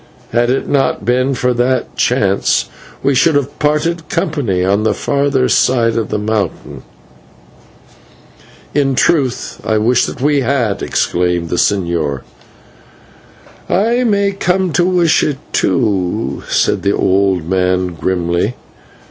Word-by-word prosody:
Had 120 Hz, +1 st, +1 dB
it 130 Hz, -, -1 dB
not 140 Hz, -2 st, 0 dB
been 130 Hz, +2 st, +1 dB
for 125 Hz, 0 st, 0 dB
that 125 Hz, +1 st, -1 dB
chance, -, -, +1 dB, 0.4 s
we 140 Hz, -, +2 dB
should 150 Hz, +4 st, +3 dB
have 145 Hz, 0 st, -2 dB
parted 155 Hz, +2 st, 0 dB
company 115 Hz, -, -1 dB
on 100 Hz, +2 st, +2 dB
the 110 Hz, -, +1 dB
further 140 Hz, -2 st, 0 dB
side 115 Hz, -1 st, +2 dB
of 115 Hz, -3 st, -2 dB
the -, -, -1 dB
mountain." 105 Hz, 0 st, -3 dB, 1.9 s
"In 135 Hz, -2 st, +1 dB
truth 130 Hz, -4 st, 0 dB
I 110 Hz, -, 0 dB
wish 120 Hz, +3 st, +2 dB
that -, -, -7 dB
we 145 Hz, +2 st, +2 dB
had!" 120 Hz, -5 st, 0 dB
exclaimed 90 Hz, -1 st, -1 dB
the 90 Hz, -, -2 dB
señor. 85 Hz, -9 st, 0 dB, 1.5 s
"I 235 Hz, +6 st, +1 dB
may 200 Hz, -3 st, +1 dB
come 185 Hz, -2 st, 0 dB
to 175 Hz, +5 st, +2 dB
wish 175 Hz, -3 st, +2 dB
it, 145 Hz, -3 st, -1 dB, 0.2 s
too," 105 Hz, -4 st, 0 dB
said -, -, +1 dB
the 100 Hz, -, +1 dB
old 95 Hz, -3 st, +1 dB
man 90 Hz, 0 st, +1 dB
grimly. 85 Hz, +5 st, -1 dB
125 Hz, 130 wpm, -15 LUFS, 95-145 Hz, 1.9 s, should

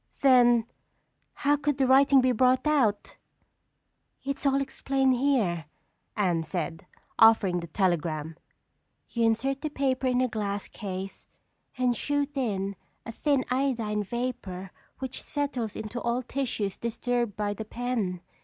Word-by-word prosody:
"Then 240 Hz, -4 st, +5 dB, 0.8 s
how 290 Hz, +1 st, +5 dB
could 290 Hz, -1 st, -1 dB
the 270 Hz, -, +3 dB
writing 270 Hz, +1 st, +6 dB
be 255 Hz, 0 st, +3 dB
brought 255 Hz, +2 st, +3 dB
out?" 255 Hz, -9 st, +1 dB, 1.1 s
"It's 275 Hz, +1 st, -2 dB
all 275 Hz, 0 st, +3 dB
explained 270 Hz, -1 st, +1 dB
here," 240 Hz, -, +1 dB, 0.5 s
Anne 180 Hz, -5 st, +2 dB
said, 165 Hz, 0 st, -4 dB, 0.3 s
offering 215 Hz, -5 st, +5 dB
the 170 Hz, -, -7 dB
telegram. 165 Hz, -3 st, -1 dB, 0.8 s
"You 235 Hz, -1 st, +1 dB
insert 265 Hz, +5 st, 0 dB
the 305 Hz, -, -2 dB
paper 265 Hz, -2 st, 0 dB
in 250 Hz, -1 st, +2 dB
a 255 Hz, -, +3 dB
glass 205 Hz, -3 st, -3 dB
case 195 Hz, -1 st, -7 dB, 0.5 s
and 250 Hz, -1 st, +2 dB
shoot 290 Hz, +3 st, -1 dB
in 200 Hz, -7 st, -1 dB, 0.3 s
a 230 Hz, -, -5 dB
thin 275 Hz, +2 st, +1 dB
iodine 240 Hz, -6 st, 0 dB
vapor 205 Hz, -5 st, -4 dB, 0.3 s
which 260 Hz, -1 st, -5 dB
settles 270 Hz, -7 st, -3 dB
into 220 Hz, +3 st, -5 dB
all 240 Hz, +2 st, -1 dB
tissues 230 Hz, -7 st, -2 dB
disturbed 235 Hz, -2 st, -2 dB
by 205 Hz, -1 st, -1 dB
the 220 Hz, -, -6 dB
pen. 220 Hz, -6 st, -2 dB
240 Hz, 135 wpm, -27 LUFS, 200-265 Hz, 1.1 s, writing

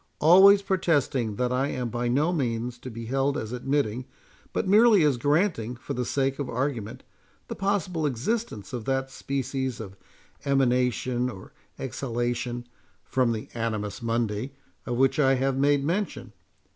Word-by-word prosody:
Always 195 Hz, +5 st, +7 dB
protesting 145 Hz, -, +1 dB
that 125 Hz, +3 st, 0 dB
I 130 Hz, +2 st, +1 dB
am 125 Hz, -3 st, -3 dB
by 120 Hz, +1 st, -2 dB
no 145 Hz, +8 st, +2 dB
means 120 Hz, -4 st, -2 dB
to 130 Hz, -, -8 dB
be 115 Hz, -1 st, -7 dB
held 135 Hz, +4 st, 0 dB
as 110 Hz, -5 st, -4 dB
admitting, 125 Hz, -2 st, -1 dB, 0.5 s
but -, -, -1 dB
merely 210 Hz, -1 st, +6 dB
as 145 Hz, -3 st, +3 dB
granting 145 Hz, -, +1 dB
for 120 Hz, -, -6 dB
the 125 Hz, 0 st, -2 dB
sake 135 Hz, +2 st, 0 dB
of 140 Hz, -, -3 dB
argument, 120 Hz, -4 st, -3 dB, 0.5 s
the -, -, -4 dB
possible 185 Hz, -5 st, 0 dB
existence 135 Hz, -, -3 dB
of 120 Hz, -3 st, -4 dB
that 135 Hz, 0 st, -1 dB
species 130 Hz, -2 st, -3 dB
of 100 Hz, -3 st, -8 dB, 0.5 s
emanation, 125 Hz, -2 st, +1 dB
or 95 Hz, -6 st, -11 dB, 0.2 s
exhalation, 120 Hz, -1 st, -3 dB, 0.4 s
from 125 Hz, -3 st, +1 dB
the 110 Hz, -2 st, -4 dB
Animus 110 Hz, -3 st, -3 dB
Mundi, 115 Hz, +2 st, -2 dB, 0.3 s
of 120 Hz, -1 st, -1 dB
which 135 Hz, +4 st, +3 dB
I 135 Hz, -2 st, +4 dB
have 135 Hz, +1 st, 0 dB
made 140 Hz, +1 st, +3 dB
mention. 145 Hz, -, -2 dB
130 Hz, 150 wpm, -26 LUFS, 120-145 Hz, 0.5 s, Always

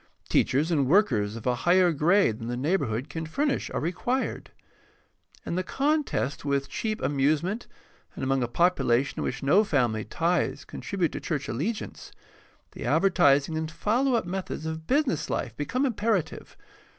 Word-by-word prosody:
Teachers 150 Hz, +6 st, +2 dB
and 145 Hz, -5 st, +2 dB
workers 120 Hz, -, +2 dB
of 115 Hz, -, -8 dB
a 125 Hz, -, +2 dB
higher 175 Hz, +7 st, +3 dB
grade 160 Hz, -, +2 dB
than 115 Hz, -, -6 dB
the 120 Hz, 0 st, -3 dB
neighborhood 135 Hz, -, -1 dB
can 160 Hz, +1 st, -5 dB
furnish 280 Hz, -, -1 dB
are -, -, -2 dB
required. 185 Hz, -, -2 dB, 1.0 s
In -, -, -3 dB
the 185 Hz, -, 0 dB
contest 275 Hz, -, -1 dB
with 140 Hz, -1 st, 0 dB
cheap 215 Hz, -1 st, -3 dB
amusement, 155 Hz, -, 0 dB, 0.5 s
and -, -, -6 dB
among 135 Hz, 0 st, +1 dB
a 120 Hz, -, 0 dB
population 135 Hz, -3 st, +1 dB
in -, -, -1 dB
which 125 Hz, -, -3 dB
no 180 Hz, +10 st, +5 dB
family 120 Hz, -, 0 dB
ties 165 Hz, -4 st, -1 dB
contribute 185 Hz, -5 st, -2 dB
to -, -, -5 dB
church 150 Hz, -4 st, -3 dB
allegiance, 180 Hz, -, -4 dB, 0.6 s
the -, -, -8 dB
advertising 145 Hz, -5 st, +3 dB
and 160 Hz, 0 st, -2 dB
follow 235 Hz, +10 st, +1 dB
up 230 Hz, -, 0 dB
methods 180 Hz, -3 st, -4 dB
of 160 Hz, 0 st, -5 dB
business 270 Hz, -, +1 dB
life 120 Hz, -3 st, -3 dB
become 250 Hz, -, -1 dB
imperative. 220 Hz, -, -2 dB
160 Hz, 155 wpm, -27 LUFS, 135-200 Hz, 1.0 s, no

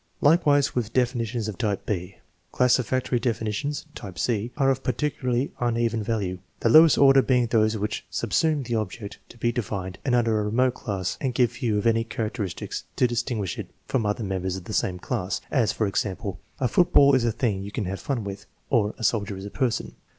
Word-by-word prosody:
Likewise 145 Hz, -2 st, +4 dB
with 115 Hz, -3 st, -2 dB
definitions 120 Hz, -3 st, 0 dB
of 110 Hz, -, -6 dB
type 105 Hz, -5 st, -1 dB
b. 90 Hz, -2 st, -3 dB, 0.4 s
Classificatory 125 Hz, 0 st, +2 dB
definitions 115 Hz, +5 st, -2 dB
(type 95 Hz, -3 st, -9 dB
c) 115 Hz, 0 st, -1 dB
are 135 Hz, -2 st, +4 dB
of 135 Hz, 0 st, -2 dB
particularly 130 Hz, -2 st, -1 dB
un 120 Hz, -1 st, 0 dB
even 115 Hz, -1 st, 0 dB
value, 100 Hz, -4 st, -2 dB, 0.2 s
the 115 Hz, -, +3 dB
lowest 155 Hz, +4 st, +8 dB
order 135 Hz, -1 st, +7 dB
being 125 Hz, -2 st, +2 dB
those 110 Hz, -1 st, +2 dB
which 105 Hz, +1 st, -3 dB
subsume 140 Hz, -, +1 dB
the 120 Hz, -, -3 dB
object 110 Hz, -1 st, -4 dB
to -, -, -14 dB
be 120 Hz, 0 st, +1 dB
defined 95 Hz, -5 st, -4 dB
under 120 Hz, -4 st, +2 dB
a 105 Hz, -, -1 dB
remote 125 Hz, +4 st, +2 dB
class 95 Hz, -7 st, -4 dB
and 130 Hz, -3 st, -1 dB
give 120 Hz, -2 st, +3 dB
few 115 Hz, -3 st, -1 dB
if 105 Hz, -, -1 dB
tiny 115 Hz, 0 st, +3 dB
characteristics 110 Hz, -4 st, -4 dB
to -, -, +3 dB
distinguish 120 Hz, -4 st, -2 dB
it -, -, -6 dB, 0.2 s
from 115 Hz, -5 st, 0 dB
other 105 Hz, +2 st, -1 dB
members 95 Hz, -2 st, -2 dB
of 95 Hz, -, -7 dB
the -, -, -7 dB
same 90 Hz, -1 st, 0 dB
class; 90 Hz, +1 st, -2 dB
as, 125 Hz, -7 st, +2 dB
for 110 Hz, -, -1 dB
example, 100 Hz, -1 st, -2 dB
" -, -, -34 dB
A 130 Hz, -, +2 dB
football 140 Hz, 0 st, +5 dB
is 130 Hz, -3 st, +3 dB
a 120 Hz, -, +2 dB
thing 110 Hz, -4 st, -1 dB
you 100 Hz, +1 st, -7 dB
can 110 Hz, -2 st, -3 dB
have 95 Hz, +2 st, -4 dB
fun 130 Hz, -6 st, -2 dB
with," 100 Hz, 0 st, -7 dB, 0.2 s
or, 110 Hz, -5 st, +2 dB
" -, -, -33 dB
A 115 Hz, -, -8 dB
soldier 105 Hz, -3 st, 0 dB
is 95 Hz, -, -7 dB
a 100 Hz, -, -7 dB
person." 125 Hz, -5 st, -1 dB
115 Hz, 205 wpm, -25 LUFS, 105-125 Hz, 0.4 s, lowest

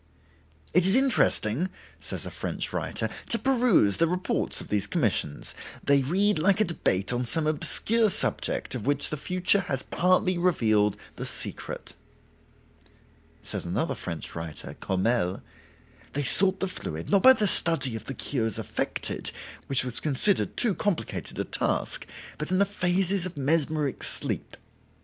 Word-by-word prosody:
"It 180 Hz, +1 st, +4 dB
is 190 Hz, -, +4 dB
interesting," 185 Hz, -, +2 dB, 0.3 s
says -, -, -4 dB
a -, -, -6 dB
French -, -, -4 dB
writer, -, -, -2 dB, 0.2 s
"to 230 Hz, -, +3 dB
peruse 240 Hz, -, +3 dB
the 165 Hz, -, +2 dB
reports 180 Hz, +1 st, -1 dB
of -, -, -9 dB
these 105 Hz, -1 st, 0 dB
commissions: 105 Hz, -, -1 dB, 0.3 s
they 140 Hz, -1 st, +4 dB
read 185 Hz, +6 st, +1 dB
like 190 Hz, +5 st, +3 dB
a 215 Hz, -, +4 dB
debate 100 Hz, -, -1 dB
on 120 Hz, +1 st, -1 dB
some 155 Hz, +7 st, +1 dB
obscure 215 Hz, +8 st, +1 dB
subject -, -, -1 dB
of 125 Hz, -2 st, -5 dB
which 145 Hz, -, +2 dB
the -, -, -1 dB
future 180 Hz, +6 st, +2 dB
has 135 Hz, -8 st, -3 dB
partly 185 Hz, 0 st, +1 dB
revealed 110 Hz, -, +2 dB, 0.2 s
the -, -, -4 dB
secret." -, -, -4 dB, 1.5 s
Says -, -, -4 dB
another -, -, -2 dB
French 85 Hz, -3 st, -6 dB
writer 80 Hz, -3 st, -6 dB
(Courmelles): 95 Hz, -1 st, 0 dB, 0.7 s
"They 145 Hz, -, -1 dB
sought 190 Hz, +6 st, +5 dB
the 195 Hz, -, +1 dB
fluid, 80 Hz, -, -6 dB
not 200 Hz, -, +4 dB
by 260 Hz, +4 st, +9 dB
the 215 Hz, -5 st, 0 dB
study 140 Hz, -9 st, +2 dB
of 110 Hz, -, -7 dB
the 135 Hz, -, -6 dB
cures 115 Hz, -7 st, -2 dB
affected, -, -, -2 dB, 0.4 s
which 135 Hz, -2 st, +5 dB
was 120 Hz, -1 st, -1 dB
considered 155 Hz, +7 st, +1 dB
too 235 Hz, -5 st, +3 dB
complicated 200 Hz, -2 st, -3 dB
a -, -, 0 dB
task, -, -, -1 dB, 0.3 s
but 150 Hz, -, -2 dB
in 185 Hz, -, +2 dB
the 200 Hz, -, +4 dB
phases 185 Hz, -1 st, 0 dB
of 170 Hz, -3 st, -11 dB
mesmeric 150 Hz, -1 st, 0 dB
sleep. -, -, -1 dB
160 Hz, 150 wpm, -26 LUFS, 120-190 Hz, 1.5 s, by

